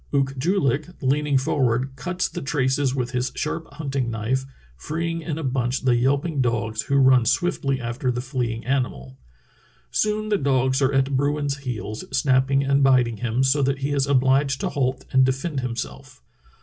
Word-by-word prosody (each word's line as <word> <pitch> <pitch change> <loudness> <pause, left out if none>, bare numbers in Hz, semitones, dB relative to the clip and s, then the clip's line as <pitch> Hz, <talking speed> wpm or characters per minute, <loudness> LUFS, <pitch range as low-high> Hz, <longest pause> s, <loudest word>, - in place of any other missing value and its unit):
Ook 135 -1 +1
joo 180 +9 +1
hk 155 +7 -4
leaning 140 +1 +2
forward 130 0 0
cuts 180 +8 -2
the - - -6
traces 135 -1 0
with 125 -2 -2
his 125 -1 -1
sharp 165 -2 -4
hunting 140 -5 -2
knife, 120 +4 -2 0.3
freeing 165 - -3
in 155 -1 -4
a 160 - -4
bunch 130 -1 -1
the 125 -2 +3
yelping 140 +4 +1
dogs 115 -3 -1
who 140 - -1
run 130 -2 +5
swiftly 135 - 0
after 120 +2 -3
the 120 - -3
fleeing 125 -3 -3
animal. 105 - -2 0.7
Soon 215 0 0
the 205 - +2
dogs 130 -1 +1
are 135 0 +3
at 135 0 +1
bruin's 145 +1 0
heels, 115 -5 -5
snapping 135 0 +2
and 140 +1 +2
biting 125 -4 +3
him 120 +2 0
so 135 +2 +3
that 135 0 +1
he 145 - -1
is 140 -1 +1
obHged 135 +1 +3
to - - -2
halt 130 -1 -1
and 130 0 +6
defend 135 +3 -1
himself. 115 - -6
135 Hz, 175 wpm, -23 LUFS, 125-140 Hz, 0.7 s, and